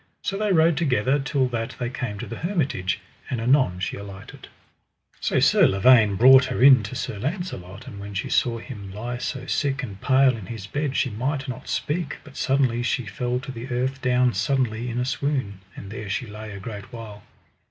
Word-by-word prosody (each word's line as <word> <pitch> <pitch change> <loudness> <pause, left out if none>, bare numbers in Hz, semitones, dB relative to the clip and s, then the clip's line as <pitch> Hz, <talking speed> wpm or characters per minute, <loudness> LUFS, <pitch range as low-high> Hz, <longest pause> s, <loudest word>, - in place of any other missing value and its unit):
So 195 - -2
they 210 0 0
rode 165 -2 +4
together 135 -4 +2
till 135 -1 0
that 120 0 -3
they 120 -1 -3
came 115 -5 -4
to - - -5
the 115 - -7
hermitage, 145 - -1 0.3
and 125 - -2
anon 120 -6 +3
she 95 - -3
alighted. 100 -1 -10 0.7
So - - +1
Sir - - +5
Lavaine 105 +1 +5
brought 130 +5 +7
her 125 -1 -1
in 130 -3 +8
to 105 +5 -7
Sir 110 -4 -4
Launcelot; 130 - -5
and 105 -7 -9
when 100 0 -8
she 95 - -2
saw 120 -2 +1
him 105 -6 -8
lie 120 +4 -5
so 130 0 -4
sick 140 0 -1
and 100 -6 -7
pale 130 -1 +4
in 110 -5 -9
his 110 -5 -6
bed 145 +4 -2
she 130 - +1
might 135 +6 -2
not 125 - -6
speak, 150 -1 -2
but 140 -2 -15
suddenly 130 -4 +1
she 120 +1 -1
fell 125 +6 -2
to 135 - -7
the 120 0 -7
earth 130 +2 -1
down 125 -1 +3
suddenly 120 +2 0
in 120 - -4
a 125 - 0
swoon, 130 -7 -2 0.2
and 100 - -9
there 105 -1 -6
she 110 - -2
lay 110 0 -8
a 100 - -7
great 100 0 -8
while. 110 -3 -9
125 Hz, 205 wpm, -24 LUFS, 105-135 Hz, 0.7 s, in